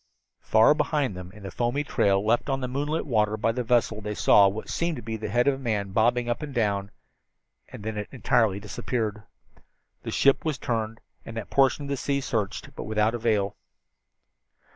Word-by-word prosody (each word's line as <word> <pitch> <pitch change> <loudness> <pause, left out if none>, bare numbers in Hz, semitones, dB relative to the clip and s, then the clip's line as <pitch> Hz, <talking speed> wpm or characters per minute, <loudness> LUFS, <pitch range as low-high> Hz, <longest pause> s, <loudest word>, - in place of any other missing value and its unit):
Far 110 +6 +5
behind 145 - 0
them 90 0 -8
in 105 +1 -14
the 95 - -6
foamy 120 +9 -1
trail 100 -7 +1
left 120 +5 +1
on 135 0 0
the 130 - -3
moonlit 145 +5 -2
water 110 -5 +1
by 110 +2 +1
the 125 +2 -2
vessel 115 -2 +1
they 105 0 -4
saw 100 -1 +6
what 100 +3 -4
seemed 170 -1 -1
to - - -8
be 110 +1 -4
the 110 -1 -5
head 120 +4 +2
of 140 - +5
a - - -5
man 105 -6 -2
bobbing 120 +3 +2
up 120 +4 -1
and 145 -3 -6
down 100 -3 0 0.8
and - - -10
then 110 0 -4
it 105 - -6
entirely 115 -6 +1
disappeared. 105 +1 -3 0.8
The - - -6
ship 140 0 +3
was 155 -4 -1
turned, 115 -2 -3 0.2
and 115 - -8
that 115 - -6
portion 135 +1 +3
of - - -7
the 140 - -1
sea 140 +2 -1
searched, 110 +1 -3
but - - -6
without 110 +1 +1
avail. 105 -4 0
115 Hz, 200 wpm, -26 LUFS, 105-130 Hz, 0.8 s, saw